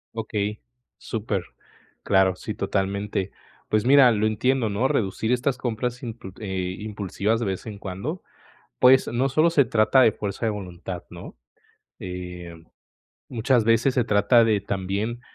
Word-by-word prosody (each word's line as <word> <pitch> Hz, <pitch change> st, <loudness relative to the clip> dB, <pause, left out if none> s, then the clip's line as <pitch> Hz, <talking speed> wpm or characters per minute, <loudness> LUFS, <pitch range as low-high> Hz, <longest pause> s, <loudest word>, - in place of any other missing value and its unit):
Okey, 105 Hz, -2 st, -3 dB, 0.4 s
súper. 105 Hz, -5 st, -3 dB, 0.6 s
Claro, 95 Hz, -1 st, +3 dB
sí, 110 Hz, -, -6 dB
totalmente. 100 Hz, 0 st, -2 dB, 0.4 s
Pues 110 Hz, +1 st, +1 dB
mira, 135 Hz, -1 st, +7 dB
lo 110 Hz, -1 st, +1 dB
entiendo, 125 Hz, +2 st, +1 dB
¿no? 105 Hz, +6 st, +1 dB
Reducir 110 Hz, +2 st, -1 dB
estas 125 Hz, +1 st, +1 dB
compras 125 Hz, 0 st, -3 dB
impul 115 Hz, -6 st, -7 dB
eh, 95 Hz, -3 st, -3 dB
impulsivas 105 Hz, +1 st, -2 dB
de 120 Hz, -, -2 dB
vez 95 Hz, -2 st, -3 dB
en 105 Hz, -3 st, -7 dB
cuando, 100 Hz, -, -5 dB, 0.6 s
pues, 130 Hz, +1 st, +6 dB
no 125 Hz, +3 st, 0 dB
solo 155 Hz, +5 st, +3 dB
se 150 Hz, -4 st, +4 dB
trata 115 Hz, +3 st, +3 dB
de 115 Hz, -, +6 dB
fuerza 105 Hz, +3 st, -4 dB
de -, -, +2 dB
voluntad, 90 Hz, -3 st, -7 dB
¿no?, -, -, -10 dB, 0.6 s
eh, 90 Hz, -2 st, -7 dB, 0.7 s
muchas 120 Hz, 0 st, +1 dB
veces 115 Hz, +4 st, +3 dB
se 125 Hz, -, +3 dB
trata 105 Hz, +2 st, +4 dB
de 110 Hz, -2 st, +2 dB
también 100 Hz, +4 st, -3 dB
110 Hz, 145 wpm, -24 LUFS, 95-120 Hz, 0.7 s, mira